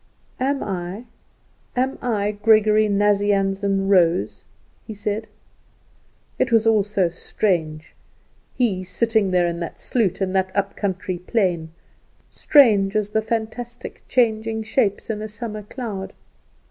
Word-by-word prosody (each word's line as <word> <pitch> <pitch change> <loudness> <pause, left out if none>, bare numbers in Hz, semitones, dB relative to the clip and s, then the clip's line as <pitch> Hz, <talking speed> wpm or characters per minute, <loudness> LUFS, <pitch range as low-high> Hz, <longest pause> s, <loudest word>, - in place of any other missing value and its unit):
"Am 275 +2 0
I, 190 +3 -5 0.7
am 260 +2 -1
I 210 -4 0
Gregory 215 0 +3
Nazianzen 200 -1 +1
Rose?" 180 -3 +2 0.4
he 220 - -7
said. 210 +2 -3 1.1
It - - +1
was 225 -1 +4
also 205 -4 +2
strange, 160 -3 -2 0.6
he 205 -7 0
sitting 220 +2 +1
there 180 -1 +2
in 170 0 -2
that 170 - -6
sloot 205 -7 0
in 190 -1 -1
that 190 0 +1
up 200 -1 -1
country 185 -2 -3
plain! 180 -4 -1 0.6
strange 210 -9 +4
as 210 -1 0
the 220 +1 0
fantastic, 230 +2 -5
changing 225 -2 +1
shapes 220 -2 0
in 210 -1 -4
a 215 - -4
summer 215 0 -6
cloud. 210 -3 -6
205 Hz, 120 wpm, -22 LUFS, 190-220 Hz, 1.1 s, was